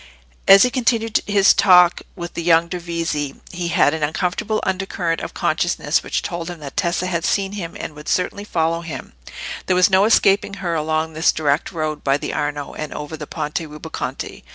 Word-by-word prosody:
As 195 Hz, 0 st, +9 dB
he 250 Hz, -, +2 dB
continued 230 Hz, -3 st, +1 dB
his 200 Hz, -1 st, +5 dB
talk 180 Hz, -2 st, +5 dB
with 170 Hz, -2 st, -7 dB
the -, -, -4 dB
young 165 Hz, 0 st, +4 dB
Dovizi, 170 Hz, -5 st, -3 dB, 0.2 s
he 175 Hz, -1 st, -3 dB
had 165 Hz, -3 st, +3 dB
an 160 Hz, -, -3 dB
uncomfortable 180 Hz, +8 st, -1 dB
undercurrent 185 Hz, -3 st, -2 dB
of -, -, -7 dB
consciousness -, -, 0 dB
which -, -, -2 dB
told 170 Hz, -2 st, -4 dB
him 175 Hz, -2 st, -7 dB
that 140 Hz, -2 st, -9 dB
Tessa 185 Hz, -2 st, 0 dB
had 170 Hz, -3 st, -2 dB
seen 195 Hz, +1 st, 0 dB
him 185 Hz, -5 st, -6 dB
and -, -, -6 dB
would 150 Hz, 0 st, -9 dB
certainly 185 Hz, +2 st, -1 dB
follow 165 Hz, -4 st, 0 dB
him: 155 Hz, -6 st, -8 dB, 0.5 s
there 185 Hz, -, +2 dB
was 180 Hz, +2 st, +4 dB
no 190 Hz, +1 st, +5 dB
escaping 200 Hz, -2 st, +3 dB
her 180 Hz, -4 st, -3 dB
along 160 Hz, 0 st, -1 dB
this 160 Hz, +1 st, +3 dB
direct 150 Hz, +1 st, 0 dB
road 155 Hz, -3 st, -3 dB
by 135 Hz, 0 st, +2 dB
the 145 Hz, -, -5 dB
Arno, 145 Hz, -1 st, -3 dB
and 155 Hz, -1 st, -6 dB
over 150 Hz, +1 st, -6 dB
the -, -, -8 dB
Ponte 150 Hz, 0 st, -3 dB
Rubaconte. 150 Hz, -2 st, -6 dB
170 Hz, 190 wpm, -20 LUFS, 155-190 Hz, 0.5 s, As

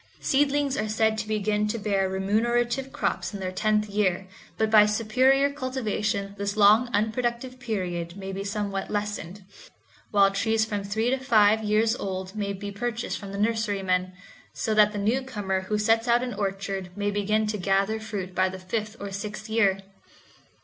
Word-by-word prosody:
Seedlings 280 Hz, 0 st, +1 dB
are 215 Hz, 0 st, -1 dB
said 220 Hz, 0 st, +2 dB
to 220 Hz, -, -4 dB
begin 210 Hz, 0 st, 0 dB
to 210 Hz, -, -2 dB
bear 200 Hz, -3 st, 0 dB
remunerative 240 Hz, +7 st, 0 dB
crops -, -, -2 dB
in -, -, -5 dB
their 185 Hz, -1 st, -3 dB
tenth 210 Hz, +2 st, +1 dB
year, 195 Hz, -3 st, 0 dB, 0.3 s
but 220 Hz, 0 st, +1 dB
by 210 Hz, -1 st, +7 dB
superior 260 Hz, +6 st, +3 dB
cultivation 215 Hz, -7 st, -2 dB
this 200 Hz, +1 st, -2 dB
long 215 Hz, +4 st, +6 dB
unproductive 240 Hz, +4 st, -1 dB
period 180 Hz, -7 st, -3 dB
my 195 Hz, -1 st, -6 dB
be 195 Hz, +1 st, -4 dB
somewhat 200 Hz, -1 st, -3 dB
lessened, 205 Hz, -2 st, -4 dB, 0.7 s
while 200 Hz, -1 st, +4 dB
trees 220 Hz, +2 st, +1 dB
from 205 Hz, -2 st, -3 dB
three 220 Hz, +4 st, 0 dB
to 265 Hz, -, 0 dB
five 220 Hz, -4 st, +4 dB
years 215 Hz, +2 st, +2 dB
old 190 Hz, -2 st, -5 dB
may 200 Hz, -2 st, -2 dB
be 200 Hz, +1 st, -6 dB
purchased 235 Hz, +3 st, -3 dB
from 200 Hz, -2 st, -8 dB
the 200 Hz, -, -5 dB
nurserymen, 200 Hz, -4 st, 0 dB, 0.4 s
so 220 Hz, -, -1 dB
that 210 Hz, -1 st, +5 dB
the 210 Hz, -, -5 dB
newcomer 205 Hz, -3 st, -1 dB
who 210 Hz, -, 0 dB
sets 225 Hz, +2 st, +2 dB
out 240 Hz, +1 st, +3 dB
an 245 Hz, -2 st, -3 dB
orchard 195 Hz, -2 st, -3 dB
may 205 Hz, 0 st, 0 dB
begin 210 Hz, +2 st, +1 dB
to 210 Hz, -1 st, -2 dB
gather 195 Hz, +3 st, +1 dB
fruit 200 Hz, -4 st, -5 dB
by 185 Hz, +1 st, +2 dB
the 190 Hz, -, -7 dB
fifth 210 Hz, +4 st, -4 dB
or 200 Hz, -1 st, -6 dB
sixth 210 Hz, +2 st, -6 dB
year. 200 Hz, -4 st, +2 dB
210 Hz, 170 wpm, -26 LUFS, 195-225 Hz, 0.7 s, by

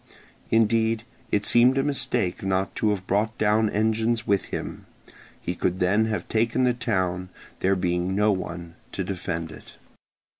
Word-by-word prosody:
Indeed, 115 Hz, 0 st, +2 dB, 0.3 s
it 105 Hz, 0 st, +1 dB
seemed 120 Hz, +4 st, +5 dB
a 135 Hz, -, +3 dB
mistake 125 Hz, -9 st, 0 dB
not 95 Hz, 0 st, 0 dB
to 110 Hz, -, +2 dB
have 100 Hz, -3 st, -1 dB
brought 110 Hz, +4 st, 0 dB
down 110 Hz, +1 st, +3 dB
engines 110 Hz, +2 st, +1 dB
with 100 Hz, -2 st, +1 dB
him; -, -, -6 dB, 0.5 s
he 90 Hz, -, -3 dB
could 90 Hz, +1 st, -1 dB
then 100 Hz, +5 st, +3 dB
have 110 Hz, -1 st, -3 dB
taken 115 Hz, +3 st, +1 dB
the 125 Hz, -1 st, +3 dB
town, 95 Hz, -7 st, -1 dB, 0.3 s
there 95 Hz, +1 st, +2 dB
being 90 Hz, 0 st, 0 dB
no 105 Hz, +1 st, +3 dB
one 85 Hz, -3 st, -4 dB, 0.2 s
to 95 Hz, -, -2 dB
defend 85 Hz, -3 st, -4 dB
it. -, -, -13 dB
105 Hz, 155 wpm, -25 LUFS, 90-110 Hz, 0.5 s, seemed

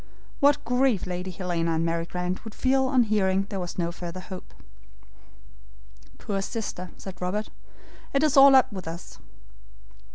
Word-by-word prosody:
What 285 Hz, +1 st, +4 dB
grief 250 Hz, -3 st, +2 dB
Lady 180 Hz, 0 st, -4 dB
Helena 170 Hz, -2 st, -1 dB
and 165 Hz, +1 st, 0 dB
Mary 165 Hz, 0 st, -1 dB
Grant 180 Hz, +1 st, -3 dB
would 220 Hz, -2 st, -9 dB
feel 265 Hz, 0 st, +2 dB
on 255 Hz, -2 st, +4 dB
hearing 195 Hz, -3 st, +1 dB
there 195 Hz, -, -2 dB
was 175 Hz, -1 st, -5 dB
no 170 Hz, -1 st, 0 dB
further 175 Hz, +1 st, -7 dB
hope. 185 Hz, 0 st, -9 dB, 1.7 s
"Poor 195 Hz, -2 st, -3 dB
sister!" 195 Hz, -4 st, -5 dB
said 185 Hz, -2 st, -10 dB
Robert. 200 Hz, +4 st, -2 dB, 0.6 s
"It 275 Hz, +2 st, +2 dB
is 305 Hz, -3 st, +3 dB
all 275 Hz, 0 st, +9 dB
up 260 Hz, -4 st, +5 dB
with 185 Hz, -4 st, -7 dB
us." 165 Hz, +2 st, -8 dB
190 Hz, 155 wpm, -26 LUFS, 180-240 Hz, 1.7 s, all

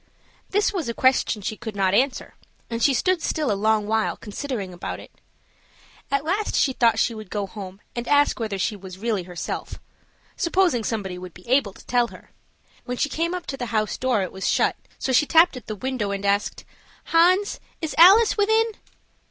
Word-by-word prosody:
This 410 Hz, +1 st, +1 dB
was 335 Hz, -10 st, -2 dB
a 235 Hz, -, -3 dB
question 260 Hz, -5 st, +2 dB
she 215 Hz, -, -3 dB
could 220 Hz, -2 st, -7 dB
not 190 Hz, -1 st, +1 dB
answer, 260 Hz, +5 st, +1 dB, 0.4 s
and 230 Hz, 0 st, -3 dB
she 280 Hz, -, +5 dB
stood 360 Hz, +6 st, +1 dB
still 300 Hz, -7 st, -1 dB
a -, -, +3 dB
long 215 Hz, +1 st, +1 dB
while 220 Hz, +1 st, 0 dB
considering 210 Hz, -3 st, -5 dB
about 175 Hz, -, -6 dB
it. -, -, -13 dB, 1.0 s
At 280 Hz, +1 st, 0 dB
last 400 Hz, +6 st, -1 dB
she 265 Hz, -, +2 dB
thought 235 Hz, -2 st, +3 dB
she 235 Hz, -, +1 dB
would 215 Hz, -3 st, -9 dB
go 205 Hz, -2 st, -2 dB
home 195 Hz, -1 st, -9 dB, 0.2 s
and 240 Hz, 0 st, -4 dB
ask 290 Hz, -2 st, +3 dB
whether 215 Hz, -4 st, -2 dB
she 210 Hz, +3 st, -1 dB
was 190 Hz, -2 st, -10 dB
really 215 Hz, -1 st, -1 dB
herself 175 Hz, -1 st, -6 dB, 0.6 s
supposing 350 Hz, -, +1 dB
somebody 195 Hz, -5 st, -3 dB
would 180 Hz, -2 st, -10 dB
be 180 Hz, -, -15 dB
able 240 Hz, -5 st, +2 dB
to -, -, -16 dB
tell 245 Hz, -1 st, +2 dB
her. -, -, -15 dB, 0.5 s
When 250 Hz, -1 st, -4 dB
she 290 Hz, -, 0 dB
came 335 Hz, +4 st, -1 dB
up 360 Hz, -, -6 dB
to 270 Hz, -, -5 dB
the 245 Hz, -, -4 dB
house 215 Hz, -2 st, -1 dB
door 250 Hz, -6 st, +1 dB
it 185 Hz, -, -5 dB
was 190 Hz, 0 st, -4 dB
shut; -, -, +2 dB, 0.2 s
so 265 Hz, -, -2 dB
she 295 Hz, +4 st, +4 dB
tapped 330 Hz, -1 st, +5 dB
at 250 Hz, -, -10 dB
the 215 Hz, -, -4 dB
window, 255 Hz, -2 st, -3 dB
and 200 Hz, 0 st, -3 dB
asked, 200 Hz, +1 st, 0 dB, 0.5 s
"Hans, 365 Hz, +5 st, +4 dB, 0.2 s
is 320 Hz, -2 st, -3 dB
Alice 400 Hz, +6 st, +8 dB
within?" 440 Hz, +2 st, +2 dB
235 Hz, 200 wpm, -23 LUFS, 205-305 Hz, 1.0 s, Alice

